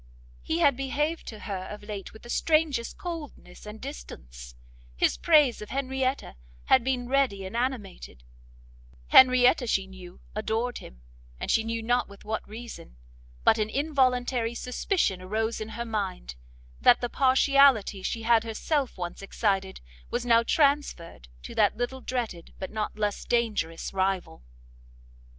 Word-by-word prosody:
He 160 Hz, -, -2 dB
had 250 Hz, +10 st, +4 dB
behaved 295 Hz, +5 st, -2 dB
to 215 Hz, -2 st, -8 dB
her 190 Hz, -2 st, -5 dB
of 210 Hz, 0 st, -8 dB
late 205 Hz, -2 st, -7 dB
with 220 Hz, -, -15 dB
the 240 Hz, -, -12 dB
strangest 310 Hz, -7 st, +1 dB
coldness 305 Hz, -, -8 dB
and 210 Hz, +1 st, -8 dB
distance, -, -, -9 dB, 0.4 s
his -, -, +2 dB
praise 300 Hz, -9 st, +4 dB
of 210 Hz, -, -8 dB
Henrietta 265 Hz, -, -2 dB, 0.3 s
had 260 Hz, -, +5 dB
been 250 Hz, -1 st, -1 dB
ready 255 Hz, -8 st, +1 dB
and 190 Hz, +4 st, -7 dB
animated, 225 Hz, -, -4 dB, 0.9 s
Henrietta 255 Hz, +1 st, +6 dB
she 195 Hz, -3 st, +1 dB
knew 185 Hz, -2 st, -12 dB
adored 225 Hz, +3 st, -2 dB
him, -, -, -14 dB, 0.4 s
and -, -, -2 dB
she 225 Hz, -, +3 dB
knew 230 Hz, 0 st, -3 dB
not 245 Hz, +2 st, +1 dB
with 200 Hz, -, -15 dB
what 220 Hz, 0 st, -4 dB
reason, 220 Hz, -, -10 dB, 0.5 s
but 220 Hz, -, +4 dB
an 215 Hz, 0 st, 0 dB
involuntary 255 Hz, -4 st, +1 dB
suspicion 250 Hz, -, -1 dB
arose 220 Hz, +4 st, -2 dB
in 215 Hz, -, -5 dB
her 235 Hz, +2 st, -5 dB
mind, 200 Hz, -, -4 dB, 0.5 s
that 245 Hz, -, +6 dB
the 245 Hz, -, -2 dB
partiality 265 Hz, -5 st, +4 dB
she 225 Hz, +4 st, -3 dB
had 230 Hz, -1 st, +4 dB
herself 260 Hz, +4 st, -2 dB
once 175 Hz, +1 st, -5 dB
excited, 195 Hz, -1 st, -1 dB, 0.3 s
was 240 Hz, 0 st, -2 dB
now 230 Hz, -1 st, +5 dB
transferred 275 Hz, -, 0 dB, 0.2 s
to -, -, -8 dB
that -, -, +2 dB
little 250 Hz, +2 st, -3 dB
dreaded, 230 Hz, -11 st, -4 dB
but 190 Hz, -, -6 dB
not 215 Hz, -1 st, -3 dB
less 210 Hz, -1 st, -1 dB
dangerous 215 Hz, -10 st, -1 dB
rival. 190 Hz, -, -1 dB
230 Hz, 145 wpm, -27 LUFS, 195-260 Hz, 0.9 s, Henrietta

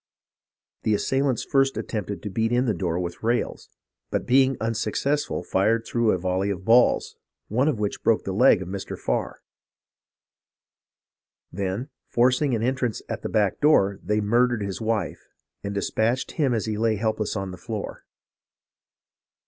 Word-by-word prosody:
The 110 Hz, -, +2 dB
assailants 135 Hz, +2 st, 0 dB
lirst 135 Hz, -1 st, +3 dB
attempted 100 Hz, -4 st, -4 dB
to 105 Hz, -, -4 dB
beat 115 Hz, +3 st, 0 dB
in 125 Hz, +1 st, +2 dB
the 115 Hz, -, +1 dB
door 90 Hz, -3 st, -2 dB
with 85 Hz, -1 st, -5 dB
rails, 120 Hz, +2 st, -1 dB, 0.4 s
but -, -, -2 dB
being 130 Hz, +1 st, +4 dB
unsuccessful 115 Hz, +6 st, -1 dB
fired 115 Hz, +4 st, +1 dB
through 120 Hz, -2 st, +1 dB
a 95 Hz, -, +3 dB
volley 95 Hz, +2 st, -1 dB
of 95 Hz, -2 st, -4 dB
balls, 120 Hz, +3 st, +4 dB, 0.3 s
one 125 Hz, +7 st, +2 dB
of 150 Hz, -7 st, +1 dB
which 105 Hz, -1 st, -2 dB
broke 115 Hz, -, +2 dB
the 95 Hz, -, -3 dB
leg 95 Hz, -1 st, +5 dB
of -, -, -10 dB
Mr. 95 Hz, +1 st, -5 dB
Farr; -, -, -2 dB, 2.1 s
then, 100 Hz, +8 st, -3 dB, 0.2 s
forcing 130 Hz, +2 st, +2 dB
an 110 Hz, -, -2 dB
entrance 125 Hz, -2 st, -1 dB
at -, -, -4 dB
a -, -, -3 dB
back 105 Hz, -3 st, +1 dB
door, 100 Hz, -10 st, +4 dB
they 105 Hz, +3 st, 0 dB
murdered 120 Hz, +1 st, +2 dB
his 100 Hz, +2 st, -4 dB
wife, 110 Hz, -1 st, -1 dB, 0.4 s
and 100 Hz, 0 st, -4 dB
despatched 110 Hz, +5 st, 0 dB
him 145 Hz, -5 st, +1 dB
as 115 Hz, -3 st, 0 dB
he 110 Hz, -1 st, -3 dB
lay 115 Hz, -1 st, +2 dB
help 110 Hz, +1 st, -1 dB
less 105 Hz, -, -2 dB
on 95 Hz, -2 st, -3 dB
the 90 Hz, -, -8 dB
floor. 105 Hz, +3 st, -6 dB
110 Hz, 160 wpm, -25 LUFS, 100-125 Hz, 2.1 s, leg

